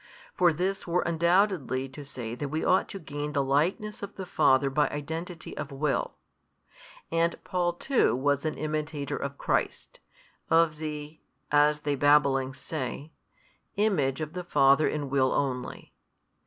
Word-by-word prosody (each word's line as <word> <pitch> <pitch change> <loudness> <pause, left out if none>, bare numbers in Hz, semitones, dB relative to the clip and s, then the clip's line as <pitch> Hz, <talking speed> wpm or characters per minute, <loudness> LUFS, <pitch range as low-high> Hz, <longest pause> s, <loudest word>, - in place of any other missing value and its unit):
For 175 -2 +4
this 185 +5 -2
were 175 +1 +1
undoubtedly 170 -5 +1
to 145 +3 -9
say 125 -5 -6
that 140 +4 -4
we 155 +2 -2
ought 185 - +3
to - - -6
gain 150 -3 -5
the 140 -1 +1
likeness 175 - 0
of 200 - -7
the 190 - -6
Father 140 -5 +3
by 145 +1 +2
identity 165 +4 -6
of 140 - -5
will. 140 +1 -1 1.0
And 165 0 +2
Paul 175 -1 0
too 255 - +2
was 140 +2 +1
an 155 - -2
imitator 150 -1 -3
of 140 0 -5
Christ, - - -2 0.5
of 165 -2 +4
the 150 0 -6 0.3
(as 150 0 +4
they 145 -1 0
babbling 140 -2 +3
say) 145 +1 -5 0.6
Image 160 -10 +1
of 155 0 -4
the 180 0 -4
Father 140 -3 +4
in 145 -2 -2
will 130 -2 +2
only. 130 -3 -3
150 Hz, 150 wpm, -28 LUFS, 140-170 Hz, 1.0 s, For